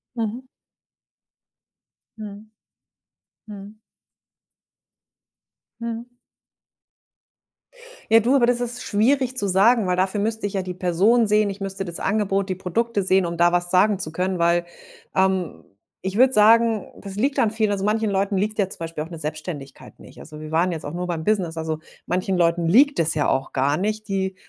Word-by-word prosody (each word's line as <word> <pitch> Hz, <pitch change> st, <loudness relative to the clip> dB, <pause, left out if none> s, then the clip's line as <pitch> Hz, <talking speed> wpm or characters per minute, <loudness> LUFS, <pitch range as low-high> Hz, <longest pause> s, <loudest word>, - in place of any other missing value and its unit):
Mhm. 235 Hz, +3 st, -4 dB, 1.7 s
Mhm, 210 Hz, 0 st, -9 dB, 1.0 s
mhm. 205 Hz, 0 st, -11 dB, 2.0 s
Mhm. 235 Hz, +1 st, -5 dB, 2.0 s
Ja, 225 Hz, +1 st, +7 dB
du, 240 Hz, +5 st, +2 dB
aber 240 Hz, -, +4 dB
das 245 Hz, 0 st, +1 dB
ist 245 Hz, 0 st, -4 dB
schwierig 255 Hz, +4 st, +1 dB
zu 205 Hz, -, -1 dB
sagen, 205 Hz, +3 st, +4 dB
weil 180 Hz, -, 0 dB
dafür 190 Hz, +3 st, 0 dB
müsste 220 Hz, 0 st, -1 dB
ich 205 Hz, -, -6 dB
ja 195 Hz, -, 0 dB
die 185 Hz, -, -5 dB
Person 190 Hz, +6 st, +2 dB
sehen, 210 Hz, 0 st, +2 dB
ich 200 Hz, +1 st, -8 dB
müsste 195 Hz, 0 st, -4 dB
das 170 Hz, -2 st, -6 dB
Angebot, 200 Hz, -1 st, 0 dB
die 185 Hz, -, -1 dB
Produkte 200 Hz, +4 st, -1 dB
sehen, 190 Hz, -1 st, +2 dB
um 170 Hz, 0 st, -4 dB
da 175 Hz, +1 st, +3 dB
was 175 Hz, 0 st, +1 dB
sagen 195 Hz, +2 st, +3 dB
zu 160 Hz, -4 st, -5 dB
können, 185 Hz, +2 st, -2 dB
weil, 170 Hz, 0 st, +2 dB, 0.5 s
ähm, 190 Hz, -3 st, 0 dB, 0.4 s
ich 190 Hz, +1 st, -4 dB
würde 260 Hz, +3 st, +5 dB
sagen, 225 Hz, -1 st, +4 dB, 0.2 s
das 195 Hz, -1 st, -8 dB
liegt 270 Hz, +6 st, 0 dB
an 230 Hz, -5 st, +3 dB
vielen 215 Hz, -1 st, 0 dB
also, 195 Hz, -1 st, -2 dB
manchen 215 Hz, +1 st, +1 dB
Leuten 195 Hz, 0 st, 0 dB
liegt 215 Hz, +3 st, -2 dB
ja 200 Hz, -3 st, +1 dB
zum -, -, -9 dB
Beispiel 165 Hz, -2 st, -5 dB
auch -, -, -12 dB
'ne 165 Hz, -, -8 dB
Selbstständigkeit 150 Hz, -2 st, -7 dB
nicht. -, -, -14 dB
Also, 155 Hz, 0 st, -11 dB
wir 155 Hz, 0 st, -8 dB
waren 175 Hz, +3 st, +2 dB
jetzt 160 Hz, -3 st, -6 dB
auch 145 Hz, -, -6 dB
nur 180 Hz, +1 st, -3 dB
beim 165 Hz, -2 st, -3 dB
Business, 180 Hz, -6 st, 0 dB
also 160 Hz, -1 st, -3 dB, 0.3 s
manchen 185 Hz, +1 st, -1 dB
Leuten, 170 Hz, 0 st, +2 dB
liegt 270 Hz, -, +4 dB
es 165 Hz, -1 st, +2 dB
ja 150 Hz, -2 st, 0 dB
auch 135 Hz, 0 st, -1 dB
gar 140 Hz, +2 st, +1 dB
nicht. 215 Hz, +4 st, -3 dB
Die 190 Hz, -1 st, -2 dB
195 Hz, 175 wpm, -22 LUFS, 175-220 Hz, 2.0 s, Ja